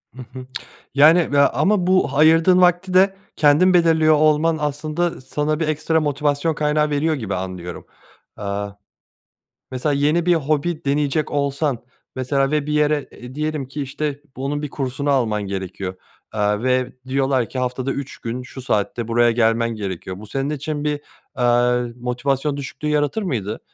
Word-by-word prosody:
Hı 130 Hz, -, -8 dB
hı, 130 Hz, -1 st, -8 dB, 0.5 s
yani, 160 Hz, +4 st, +5 dB
ve 145 Hz, -, +3 dB
ama 185 Hz, +6 st, +3 dB
bu 185 Hz, -6 st, +3 dB
ayırdığın 165 Hz, +4 st, +5 dB
vakti 180 Hz, +1 st, +3 dB
de 190 Hz, +1 st, +4 dB, 0.2 s
kendin 160 Hz, +5 st, +4 dB
belirliyor 160 Hz, -2 st, +4 dB
olman 155 Hz, +2 st, +3 dB
aslında 155 Hz, +3 st, -2 dB
sana 150 Hz, +4 st, -2 dB
bir 160 Hz, -, 0 dB
ekstra 155 Hz, +1 st, +1 dB
motivasyon 145 Hz, +1 st, 0 dB
kaynağı 150 Hz, 0 st, +1 dB
veriyor 150 Hz, +2 st, +1 dB
gibi 110 Hz, -9 st, -3 dB
anlıyorum. 90 Hz, -2 st, -6 dB, 0.5 s
Eee, -, -, -7 dB, 1.3 s
mesela 130 Hz, +4 st, -1 dB
yeni 150 Hz, +5 st, +1 dB
bir 175 Hz, -, +5 dB
hobi 155 Hz, +2 st, -1 dB
deneyecek 145 Hz, +1 st, 0 dB
olsan 140 Hz, -1 st, -1 dB, 0.4 s
mesela 135 Hz, +1 st, 0 dB
ve 150 Hz, -1 st, 0 dB
bir 150 Hz, -, -2 dB
yere, 150 Hz, -2 st, +1 dB
eee, 125 Hz, +1 st, -11 dB
diyelim 150 Hz, -3 st, -3 dB
ki, 145 Hz, +2 st, -5 dB
işte, 145 Hz, +1 st, -4 dB, 0.2 s
bunun 140 Hz, +3 st, -3 dB
bir 150 Hz, -, -4 dB
kursunu 140 Hz, +1 st, -2 dB
alman 115 Hz, -6 st, +1 dB
gerekiyor, 95 Hz, -1 st, -5 dB, 0.4 s
eee, 105 Hz, +1 st, 0 dB
ve 130 Hz, 0 st, +1 dB, 0.2 s
diyorlar 135 Hz, -2 st, +1 dB
ki 130 Hz, -, -6 dB
haftada 130 Hz, +1 st, -2 dB
3 140 Hz, -1 st, -6 dB
gün 120 Hz, +2 st, -5 dB
şu 125 Hz, +1 st, -10 dB
saatte 115 Hz, -1 st, -1 dB
buraya 120 Hz, +1 st, +3 dB
gelmen 115 Hz, 0 st, +2 dB
gerekiyor, 95 Hz, -3 st, -5 dB
bu 110 Hz, -, -10 dB
senin 135 Hz, +6 st, -2 dB
için 150 Hz, 0 st, -3 dB
bir, 150 Hz, -1 st, -1 dB, 0.4 s
eee, 120 Hz, 0 st, +2 dB
motivasyon 135 Hz, +4 st, -1 dB
düşüklüğü 140 Hz, +1 st, -5 dB
yaratır 150 Hz, +8 st, 0 dB
mıydı? 110 Hz, -, -3 dB
140 Hz, 155 wpm, -21 LUFS, 125-155 Hz, 1.3 s, yani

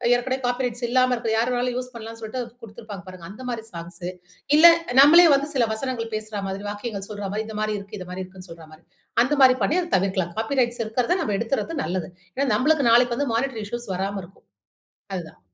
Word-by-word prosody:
ஏற்கனவே 255 Hz, +2 st, -1 dB
copy 245 Hz, +1 st, 0 dB
rights 240 Hz, 0 st, -4 dB
இல்லாம 255 Hz, +1 st, +3 dB
இருக்கும் 225 Hz, -2 st, -1 dB
யாரு 235 Hz, +3 st, +1 dB
வேணாலும் 245 Hz, 0 st, -1 dB
யூஸ் 250 Hz, 0 st, -5 dB
பண்ணலாம் 225 Hz, 0 st, -8 dB
சொல்ட்டு 220 Hz, +4 st, -5 dB
அத -, -, -4 dB, 0.2 s
கொடுத்திருப்பாங்க 210 Hz, -3 st, -9 dB
பாருங்க! 185 Hz, -2 st, -10 dB
அந்தமாரி 235 Hz, +1 st, -5 dB
சாங்ஸ். 170 Hz, +1 st, -7 dB, 0.5 s
இல்ல 330 Hz, -, +7 dB, 0.4 s
நம்மளே 335 Hz, +5 st, +9 dB
வந்து 280 Hz, +1 st, +2 dB
சில 240 Hz, -3 st, +3 dB
வசனங்கள் 230 Hz, -1 st, -4 dB
பேசுறா 215 Hz, -1 st, -4 dB
மாதிரி, 195 Hz, +2 st, -5 dB
வாக்கியங்கள் 205 Hz, -1 st, -5 dB
சொல்ற 205 Hz, -1 st, -5 dB
மாதிரி, 215 Hz, +1 st, -2 dB
இந்தமாரி 215 Hz, 0 st, -2 dB
இருக்கு, 200 Hz, +1 st, -9 dB
இந்தமாரி 180 Hz, +1 st, -6 dB
இருக்குன்னு 185 Hz, -1 st, -13 dB
சொல்றமாரி. 160 Hz, 0 st, -13 dB, 0.4 s
அந்தமாரி 265 Hz, -2 st, +5 dB
பண்ணி 330 Hz, -, +2 dB
அத 345 Hz, -, -7 dB
தவிர்க்கலாம். 185 Hz, -2 st, -1 dB
காப்பி 260 Hz, +5 st, -1 dB
ரைட்ஸ் 240 Hz, -1 st, -1 dB
இருக்கிறத 245 Hz, +11 st, 0 dB
நம்ம 210 Hz, -9 st, -1 dB
எடுத்துறது 275 Hz, +7 st, -2 dB
நல்லது. 180 Hz, 0 st, -3 dB, 0.3 s
ஏன்னா, 275 Hz, +1 st, 0 dB
நம்மளுக்கு 280 Hz, 0 st, +3 dB
நாளைக்கு 240 Hz, 0 st, +5 dB
வந்து 285 Hz, -5 st, -1 dB
மானிட்டரி 235 Hz, -3 st, -1 dB
இஷ்யூஸ் 240 Hz, -2 st, -5 dB
வராம 195 Hz, +1 st, -3 dB
இருக்கும். 185 Hz, +3 st, -17 dB, 0.7 s
அது 180 Hz, -, -2 dB
தான். 90 Hz, -, -21 dB
225 Hz, 195 wpm, -24 LUFS, 195-255 Hz, 0.7 s, நம்மளே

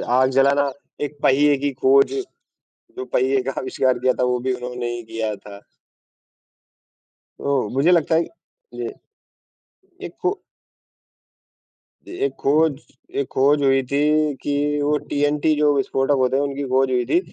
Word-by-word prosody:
आग 130 Hz, +1 st, +2 dB
जलाना, 140 Hz, +1 st, +3 dB, 0.3 s
एक 145 Hz, 0 st, -4 dB
पहिए 145 Hz, +2 st, +4 dB
की 145 Hz, +1 st, -1 dB
खोज 135 Hz, +1 st, +3 dB, 0.8 s
जो 390 Hz, -, -4 dB
पहिए 130 Hz, -, +1 dB
का 135 Hz, -, -3 dB
आविष्कार 130 Hz, -1 st, 0 dB
दिया 130 Hz, +1 st, +2 dB
था, 125 Hz, -, 0 dB
वो 125 Hz, 0 st, +1 dB
भी 130 Hz, +1 st, -1 dB
उन्होंने 125 Hz, -1 st, -5 dB
ही 120 Hz, -, -6 dB
दिया 110 Hz, -1 st, -4 dB
था। 100 Hz, 0 st, -12 dB, 1.8 s
तो 140 Hz, -6 st, 0 dB
मुझे 155 Hz, +6 st, +3 dB
लगता 165 Hz, -2 st, +3 dB
है 165 Hz, -, +4 dB, 0.5 s
जी, -, -, -4 dB, 1.2 s
एक -, -, -8 dB
खो 385 Hz, +2 st, -1 dB, 1.7 s
ए -, -, -9 dB
एक 415 Hz, -, 0 dB
खोज 150 Hz, 0 st, +2 dB, 0.4 s
एक 140 Hz, -, -2 dB
खोज 145 Hz, +2 st, +3 dB
हुई 135 Hz, -1 st, +3 dB
थी 150 Hz, +1 st, +2 dB
कि 145 Hz, -, -2 dB, 0.3 s
वो 150 Hz, +1 st, +2 dB
टिएनटी 145 Hz, +2 st, +1 dB
जो 150 Hz, -1 st, +3 dB
विस्फोटक 135 Hz, +1 st, 0 dB
होते 130 Hz, +1 st, +2 dB
हैं, 140 Hz, -, +1 dB
उनकी 140 Hz, 0 st, -4 dB
खोज 130 Hz, +1 st, +2 dB
हुई 125 Hz, -1 st, +1 dB
थी, 140 Hz, -, +3 dB
135 Hz, 150 wpm, -21 LUFS, 130-145 Hz, 1.8 s, पहिए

